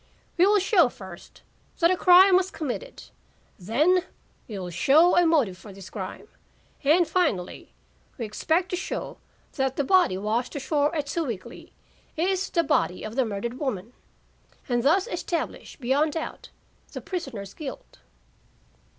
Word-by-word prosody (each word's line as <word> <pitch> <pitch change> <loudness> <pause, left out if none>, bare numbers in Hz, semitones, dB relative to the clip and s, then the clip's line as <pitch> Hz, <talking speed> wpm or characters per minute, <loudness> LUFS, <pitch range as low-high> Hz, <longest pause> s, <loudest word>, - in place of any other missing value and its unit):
"We 360 +1 +4
will 415 +1 +4
show 375 - +4
first 190 -5 -13 0.3
that 335 +1 +4
a - - +3
crime 365 +1 +7
was 370 0 +2
committed; 330 - -6 0.6
then 295 - +2 0.5
we 215 - -6
will 180 -2 -6
show 300 - +4
a 350 -1 +5
motive 250 - +1
for 205 - -12
this 195 -1 -12
crime, 190 -2 -7 0.6
and, 320 +4 +4
finally, 310 - -1 0.5
we 235 - -3
expect 320 - 0
to 360 - -1
show 375 - -5 0.4
that 265 -1 0
the 285 - 0
body 360 - +3
washed 220 +8 -2
ashore 290 +2 0
at 295 -2 -2
Sewickley 265 - -5 0.5
is 375 +3 0
the 335 - +1
body 185 - 0
of 215 +1 -6
the 260 -1 +2
murdered 225 +4 -4
woman, 235 -5 -4 0.7
and 240 -3 +1
thus 330 +9 +3
establish 345 -8 -4
beyond 285 +4 +1
doubt 320 - -6 0.4
the - - -5
prisoner's 240 - -6
guilt." 280 - -9
285 Hz, 145 wpm, -25 LUFS, 220-350 Hz, 0.7 s, crime